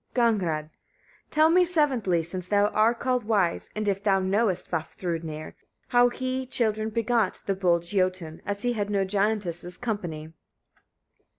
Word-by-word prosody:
Gagnrâd. 230 -4 +3 0.3
33. - - -44 0.6
Tell 310 +1 +4
me 360 +1 +5
seventhly, 265 - +1
since 180 +2 -5
thou 205 +1 +3
are 220 +3 +3
called 250 0 0
wise, 205 -6 0
and 215 0 -2
if 195 -1 0
thou 195 -2 +3
knowest, 190 0 0
Vafthrûdnir! 165 -1 -4 0.4
how 245 0 +5
he 260 +1 -3
children 220 -3 0
begat, 225 -2 0
the 195 - +1
bold 175 -3 +1
Jötun, 185 -3 -1
as 200 0 -3
he 245 0 +1
had 205 -3 -2
no 200 -2 +1
giantess's 195 -3 -1
company? 170 -9 -4
205 Hz, 150 wpm, -26 LUFS, 180-235 Hz, 0.6 s, me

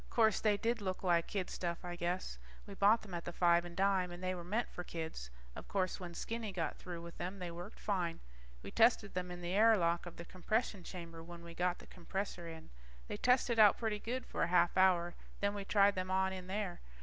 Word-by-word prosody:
Course, 220 -3 +4
they 210 -2 +3
did 230 +2 0
look 185 -1 -3
like 170 -2 +3
kid 195 -3 -2
stuff, 170 0 -3
I 175 0 -4
guess. 175 - -2 0.3
We 200 - -9
bought 205 +3 +4
them 200 -4 -10
at 170 -1 -3
the - - -5
five 170 0 +4
and 175 -1 -9
dime, 190 -2 +2
and 175 +1 -8
they 185 0 0
were 175 -2 -6
meant 215 +7 -1
for 180 - -6
kids. 160 - -5 0.3
Of - - -8
course 185 -2 -1
when 175 -2 -7
Skinny 225 +1 -3
got 170 -4 -2
through 175 -2 -7
with 170 0 -10
them, 185 +3 -4
they 180 -2 -5
worked 175 +5 -8
fine. 180 -5 -1 0.4
We - - -7
tested - - +4
them 180 0 -2
in 175 0 -7
the 175 +1 -3
air 220 +2 +6
lock 170 -1 +1
of 175 - -9
the 170 - -7
compression 200 +2 -1
chamber 170 -2 -8
when 170 +1 -10
we 170 0 -9
got 180 +1 0
the - - -13
compressor 180 -1 -5
in. 160 -1 -9 0.4
They - - -3
tested 250 -2 +3
out 210 -2 +8
pretty 220 -2 -1
good 250 +4 -3
for - - -4
a - - +3
half 175 0 +3
hour, 180 -2 +4 0.3
then 200 0 +1
we 200 -1 -5
tried 200 0 +5
them 185 -1 -3
on 190 0 +2
in 185 -1 -7
there. 195 -2 -3
185 Hz, 235 wpm, -35 LUFS, 175-200 Hz, 0.4 s, out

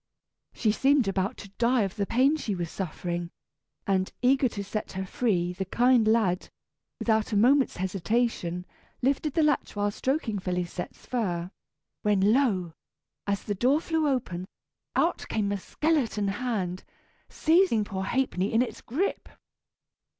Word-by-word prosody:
She 220 - +1
seemed 270 +1 +3
about 195 +4 -1
to 200 - -10
die 240 0 +3
of 195 -2 -3
the 200 -2 -1
pain 265 +6 +3
she 225 -10 -3
was 175 -2 -4
suffering, 175 -1 -4 0.6
and, 190 -1 +1
eager 260 0 +4
to 205 -2 -5
set 210 +2 -4
her 190 0 -3
free, 180 -4 0
the 190 - -3
kind 240 +3 +3
lad, 215 -5 +2 0.5
without 220 -1 +1
a - - +3
moment's 260 +5 +4
hesitation, 185 -1 -1 0.4
lifted 280 +2 +1
the 325 - +4
latch 300 -6 +1
while 205 0 0
stroking 260 -2 -1
Félisette's 180 -1 -4
fur, 180 -8 -2 0.5
when 205 0 +3
lo! 195 - +1 0.5
as 200 0 -1
the 205 - -2
door 255 +9 +3
flew 320 -2 0
open, 185 -10 -2 0.5
out - - +1
came 205 -2 0
a 200 - 0
skeleton 235 - 0
hand, 195 -5 -2 0.5
seizing 325 - +3
poor 195 -2 -4
Ha'penny 210 -5 0
in 225 +2 +4
its 255 - -7
grip! 315 - -2
210 Hz, 145 wpm, -27 LUFS, 190-255 Hz, 0.6 s, eager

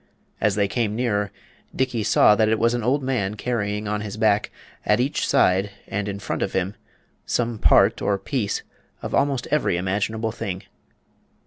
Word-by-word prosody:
As 105 -2 +2
they 100 -1 +2
came 105 +1 -1
nearer, 105 -5 0 0.4
Dickey 125 -3 0
saw 105 - +5
that 110 0 +3
it 110 - +2
was 115 +2 +2
an 120 - -1
old 130 +5 +1
man 110 -6 -1
carrying 105 -2 -2
on 105 0 -1
his 105 0 -6
back, 105 -1 +2 0.3
at 105 - +2
each 135 +4 0
side 95 -7 +3 0.2
and 100 +1 -3
in 100 -1 -3
front 100 - -4
of - - -1
him, 95 +1 -1 0.5
some 120 -2 -1
part - - +4
or 100 - +1
piece 105 +1 -2 0.4
of - - -5
almost 140 -3 +1
every 150 -12 +2
imaginable 105 +5 -1
thing. 100 -5 -5
105 Hz, 175 wpm, -23 LUFS, 100-120 Hz, 0.5 s, saw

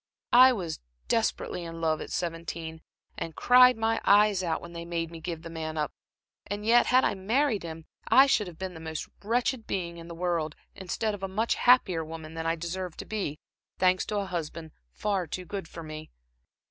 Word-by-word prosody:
"I 255 +2 +9
was 175 -9 -3 0.3
desperately 175 - 0
in 165 0 -7
love 160 -1 0
at - - -6
seventeen, 165 -1 -4 0.4
and 165 -2 -5
cried 250 0 +6
my 225 0 +1
eyes 205 -1 +5
out 170 -3 -1
when 170 0 -11
they 170 0 -6
made 170 -1 -3
me 165 -1 -9
give 165 -1 -5
the 165 - -7
man 160 -1 -4
up; 150 -1 -1 0.5
and 205 +1 -4
yet 235 +2 +5
had 255 +1 +5
I - - +2
married 220 +4 +1
him, 160 -1 -8 0.2
I 270 - +7
should 215 -7 +2
have 170 -3 -10
been 190 0 -5
the 160 - -9
most 160 -1 -5 0.2
wretched 235 +2 0
being 170 -3 -3
in 165 0 -10
the 170 - -8
world, 170 -3 -1 0.2
instead 205 +3 -2
of 205 - -7
a 195 - -2
much 215 +5 0
happier 205 -10 +4
woman 160 0 -8
than 165 0 -3
I 165 - +2
deserve 170 +1 -5
to - - -6
be, 195 -9 -3 0.4
thanks 185 0 +3
to 210 - -2
a 200 - -1
husband 165 -3 -5 0.2
far 195 - -1
too 180 +4 -5
good 195 -2 -5
for 165 0 -9
me. 155 0 -8
175 Hz, 205 wpm, -28 LUFS, 165-210 Hz, 0.5 s, I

